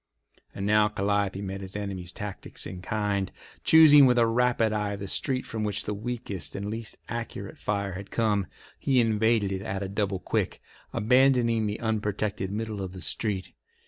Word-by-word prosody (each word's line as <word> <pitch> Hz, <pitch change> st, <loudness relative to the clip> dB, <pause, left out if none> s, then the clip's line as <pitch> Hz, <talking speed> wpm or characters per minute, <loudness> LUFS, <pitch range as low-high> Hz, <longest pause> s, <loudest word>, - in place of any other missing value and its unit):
And 100 Hz, -, -3 dB
now 105 Hz, +1 st, +4 dB
Calliope 100 Hz, -1 st, 0 dB
met 95 Hz, 0 st, -5 dB
the 95 Hz, +1 st, -5 dB
enemy's 95 Hz, -4 st, -5 dB
tactics 105 Hz, 0 st, -6 dB
in 90 Hz, -1 st, -7 dB
kind. 100 Hz, -1 st, -1 dB, 0.3 s
Choosing 150 Hz, -3 st, +8 dB
with 125 Hz, -1 st, +3 dB
a 120 Hz, -, +5 dB
rapid 115 Hz, -1 st, +2 dB
eye 105 Hz, -1 st, -1 dB
the 100 Hz, 0 st, -6 dB
street 130 Hz, +6 st, -1 dB
from 110 Hz, -1 st, -4 dB
which 105 Hz, +1 st, -1 dB
the 105 Hz, -, -2 dB
weakest 105 Hz, -5 st, -4 dB
and 100 Hz, +1 st, -4 dB
least 115 Hz, 0 st, -5 dB
accurate 115 Hz, -4 st, -6 dB
fire 100 Hz, -2 st, -1 dB
had 100 Hz, +2 st, -7 dB
come, 105 Hz, -5 st, +1 dB, 0.3 s
he 135 Hz, -2 st, +2 dB
invaded 110 Hz, -2 st, +2 dB
it 95 Hz, -1 st, -2 dB
at 95 Hz, 0 st, -3 dB
a -, -, -3 dB
double 100 Hz, 0 st, -1 dB
quick, 90 Hz, -, -2 dB, 0.3 s
abandoning 120 Hz, -1 st, +3 dB
the 105 Hz, -, -3 dB
unprotected 105 Hz, -3 st, -1 dB
middle 110 Hz, -1 st, -3 dB
of 95 Hz, -1 st, -5 dB
the 95 Hz, -, -8 dB
street. 95 Hz, +4 st, -2 dB
105 Hz, 175 wpm, -27 LUFS, 100-115 Hz, 0.3 s, Choosing